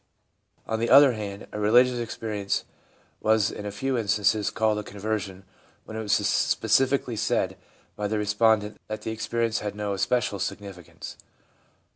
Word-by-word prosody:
On 110 0 -2
the 115 - 0
other 140 0 +8
hand, 105 -3 -6
a 105 - -5
religious 120 +4 +4
experience 110 -3 -3 0.5
was 110 -1 +2
in 105 - -6
a - - -4
few 130 +5 -1
instances 105 -1 +1
called 110 -1 +1
a - - -5
conversion 100 -2 -4 0.4
when 110 - -9
it 110 - -3
was 105 -2 0
specifically 135 -2 +2
said - - 0 0.4
by 105 - -2
the 110 +1 -1
respondent 105 0 +1
that 110 0 -6
the 110 - -3
experience 115 0 -1
had 105 -1 -5
no 105 -1 -2
especial 100 +1 0
significance. 95 -5 -7
110 Hz, 150 wpm, -26 LUFS, 105-115 Hz, 0.5 s, other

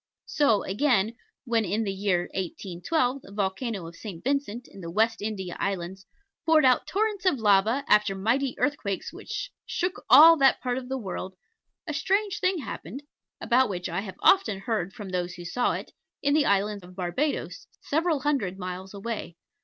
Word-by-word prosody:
So, 280 -9 +2
again, 225 0 +1 0.3
when 230 -2 +1
in 210 +3 -1
the 195 -2 -2
year 190 -2 +1
1812 210 - -2
the 195 - -14
volcano 200 0 -2
of 165 +1 -10
St. 185 -5 -8
Vincent, 255 -3 -2
in 195 - -13
the 170 - -6
West 220 +5 +1
India 195 -4 -4
Islands, 190 0 -3 0.4
poured 315 -3 +4
out 255 -1 +4
torrents 415 -1 -1
of 310 - +3
lava, 220 +4 +3
after 210 -2 +4
mighty 245 +7 0
earthquakes 230 -10 -2
which - - -6
shook 365 +2 -3
all 330 +2 +9
that 270 -2 +4
part 250 0 -1
of 250 -1 -10
the 265 - -1
world, 190 -4 -5 0.5
a 310 - -4
strange 390 +5 0
thing 370 0 +1
happened 255 - -7 0.4
(about 255 0 +3
which 180 -3 -3
I 175 +2 -2
have 195 -2 -8
often 295 - +4
heard 195 -4 -2
from 205 -2 -8
those 180 -1 -2
who 175 0 -9
saw 245 +8 0
it) - - -6 0.3
in 285 0 +3
the 300 -1 +3
island 200 0 +1
of 180 +1 -13
Barbados, 195 - -2
several 320 -1 0
hundred 255 -11 0
miles 185 +1 -6
away. 200 -4 -5
215 Hz, 175 wpm, -27 LUFS, 190-275 Hz, 0.5 s, all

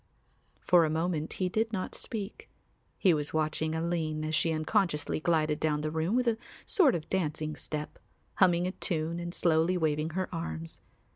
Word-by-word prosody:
For 175 -2 +5
a 155 - +1
moment 160 0 -1
he 185 - -1
did 220 +4 0
not 190 -4 -3
speak; 220 - -4 0.5
he 185 -4 +4
was 150 0 -2
watching 155 0 0
Aline 160 -2 -1
as 155 - -3
she 165 +1 +2
unconsciously 155 -1 0
glided 155 -2 +1
down 150 -1 +1
the 155 0 -2
room 160 +7 0
with 250 -1 +2
a 225 -1 +1 0.3
sort 310 - +4
of 160 - -4
dancing 155 -4 -1
step, 150 0 -5 0.4
humming 175 -2 +4
a 185 - -1
tune 165 -2 -1
and 175 0 -4
slowly 170 +1 +2
waving 155 -1 0
her 185 - 0
arms. 80 - -5
160 Hz, 170 wpm, -30 LUFS, 155-185 Hz, 0.5 s, For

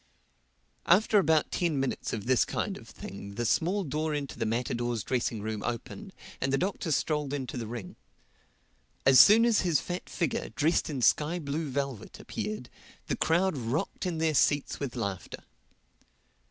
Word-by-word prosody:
After 205 +4 +5
about 160 -4 +2
ten 165 -5 0
minutes 135 -1 -2
of 105 -3 -4
this 125 -3 +4
kind - - -2
of - - -12
thing 100 +1 -9
the 120 +2 -2
small 185 - +1
door 155 0 -2
into 140 -3 -5
the 115 - 0
matadors' 120 -1 -1
dressing 120 -3 -1
room 110 -1 -3
opened 185 - -5 0.3
and 135 - 0
the 135 - +3
Doctor 185 0 -2
strolled 150 -1 0
into 135 -4 -4
the 115 -3 -4
ring. 115 -5 -7 1.1
As 130 -1 +7
soon 225 +3 +8
as 235 -3 +3
his 170 -6 +2
fat 180 +1 -5
figure, 170 -6 -2
dressed 155 +4 +1
in 135 -5 -3
sky 155 +7 +3
blue 155 -1 -3
velvet, 135 -5 -4
appeared, 105 +4 -5 0.4
the - - -1
crowd 175 +2 +2
rocked 130 +8 -2
in 170 -3 -2
their 160 -1 +1
seats 145 0 +2
with 140 -4 -4
laughter. 100 -6 -4
140 Hz, 165 wpm, -29 LUFS, 120-165 Hz, 1.1 s, soon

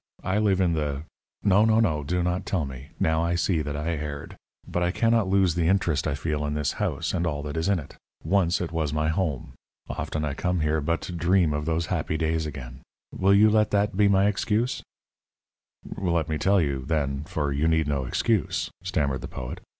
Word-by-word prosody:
I 95 +3 +1
live 100 -3 +2
in 90 -3 +2
the 75 -2 -2 0.2
" - - -44
"No, 100 +2 +6
no, 110 0 +4
no; 80 -10 +1
do 90 +4 0
not 90 +1 -1
tell 90 -6 0
me. 65 0 -9
Now 80 0 +2
I 85 +1 0
see 85 -1 +1
that 75 -1 -4
I 75 +3 -2
erred. 75 -3 -4 0.3
But 90 - -2
I 85 - +2
cannot 115 +2 +2
lose 95 -3 +3
the 85 -1 +1
interest 90 -5 +1
I - - 0
feel 75 0 -2
in 75 0 -2
this 75 -2 0
house - - -2
and 85 - 0
all 75 -3 -2
that 75 0 -5
is 80 +3 0
in 100 - +3
it. 75 - -9 0.3
Once 90 0 +2
it 85 - -3
was 80 -3 -1
my 75 +1 0
home. 80 -6 -2 0.3
Often 75 0 -3
I 70 - -2
come 90 +2 -1
here 75 0 +1
but 85 +2 -1
to - - -6
dream 85 -1 +2
of 75 0 -2
those 80 +1 0
happy 80 -2 -1
days 80 -1 0
again. 65 -4 -8 0.3
Will 95 +1 +4
you 105 +2 +7
let 105 0 +3
that 100 -1 +1
be 105 +1 +4
my 100 0 +4
excuse?" 105 +4 0 1.2
"Let 85 -4 0
me 80 -1 -1
tell 100 +1 +3
you, 70 -5 -1
then, 70 -3 -1
for 75 -2 -2
you 75 +3 +1
need 80 -2 +2
no 70 -3 -1
excuse," 90 - 0
stammered 70 -8 -1
the - - -5
poet. 60 -1 -6
80 Hz, 220 wpm, -26 LUFS, 75-95 Hz, 1.2 s, you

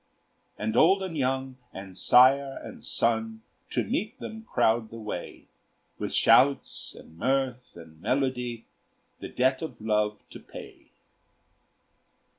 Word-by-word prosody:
And 110 +1 -2
old 190 +4 +5
and 185 -3 -5
young, 130 -1 -1
and 95 -1 -10
sire 135 +6 +5
and - - -10
son, 110 -1 -1 0.3
To 120 - 0
meet 210 - -3
them 220 0 -8
crowd 110 0 +2
the 115 - -9
way, 105 -5 -7 0.5
With - - -3
shouts, 140 +1 +3
and 80 +1 -15
mirth, 130 0 -1
and 80 -2 -14
melody, 125 -2 -1 0.5
The - - -7
debt 130 +1 +1
of 145 -8 -6
love 105 -1 0
to - - -9
pay. - - -12
125 Hz, 125 wpm, -27 LUFS, 110-135 Hz, 0.5 s, old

